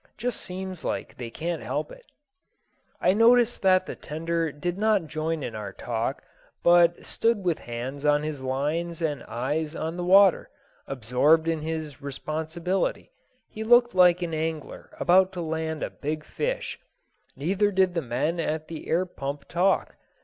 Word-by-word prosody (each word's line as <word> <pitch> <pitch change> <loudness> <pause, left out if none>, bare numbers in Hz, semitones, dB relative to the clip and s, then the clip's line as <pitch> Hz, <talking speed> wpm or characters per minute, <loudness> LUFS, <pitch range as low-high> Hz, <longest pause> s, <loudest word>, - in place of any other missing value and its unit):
Just 245 0 -2
seems 185 -2 -6
like - - -3
they 120 -2 -6
can't 165 +7 -3
help - - -3
it." - - -13 1.0
I - - +3
noticed 235 +2 +4
that 185 -1 +4
the - - -6
tender 165 +1 -2
did 175 +6 -4
not 210 -4 +2
join 155 0 -3
in 115 - -4
our 105 -2 -5
talk, 120 +3 -3 0.4
but 175 0 +5
stood 225 -3 +1
with 170 -3 +1
hands 125 +4 -6
on 150 0 +3
his 150 -3 -4
lines 150 +6 -2
and 145 -5 -1
eyes 145 +7 -2
on 160 +2 -3
the 175 - -3
water, 190 +1 +5 0.4
absorbed 135 +6 +2
in 165 -2 0
his 155 -2 -5
responsibility; 160 - -2 0.4
he 220 - -6
looked 240 +1 +5
like 180 -1 +5
an 165 -2 -3
angler 160 -1 -4
about 185 +2 +4
to 180 - -4
land 160 -1 -3
a - - -3
big 150 +1 -4
fish. - - -3 0.6
Neither 195 +7 +1
did 190 -2 +2
the 170 - 0
men 145 +6 -1
at 155 -1 -2
the 165 -2 -7
air 175 +3 +2
pump 140 -5 -6
talk. 185 +3 +1
165 Hz, 160 wpm, -26 LUFS, 150-185 Hz, 1.0 s, but